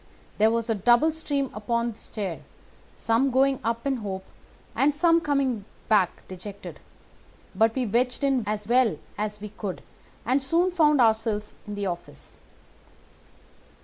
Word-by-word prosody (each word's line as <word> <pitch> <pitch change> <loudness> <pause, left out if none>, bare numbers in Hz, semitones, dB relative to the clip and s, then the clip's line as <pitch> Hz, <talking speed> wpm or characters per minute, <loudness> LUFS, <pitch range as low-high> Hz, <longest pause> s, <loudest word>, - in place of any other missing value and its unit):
There 215 +1 +5
was 230 0 0
a 225 - +2
double 240 - +4
stream 285 -4 -2
upon 235 +2 -1
the 215 - -14
stair, 195 -6 -5 0.6
some 230 +4 +1
going 265 +1 +2
up 230 +2 -2
in 275 -2 +1
hope, 195 -4 -5 0.5
and 290 +1 +3
some 335 +2 +4
coming 275 -8 0 0.3
back 200 -5 +2
dejected; 195 +2 -9 0.7
but 225 0 +2
we 260 -2 0
wedged 245 +5 0
in 270 -4 +2
as 210 -1 -3
well 240 -7 +3 0.2
as 210 0 -3
we 210 +1 -7
could 200 -2 -6 0.4
and 260 +5 +2
soon 335 +7 +2
found 300 -6 +4
ourselves 220 -2 +1
in 210 - -5
the 205 0 -3
office." 175 - -7
230 Hz, 150 wpm, -26 LUFS, 210-270 Hz, 0.7 s, There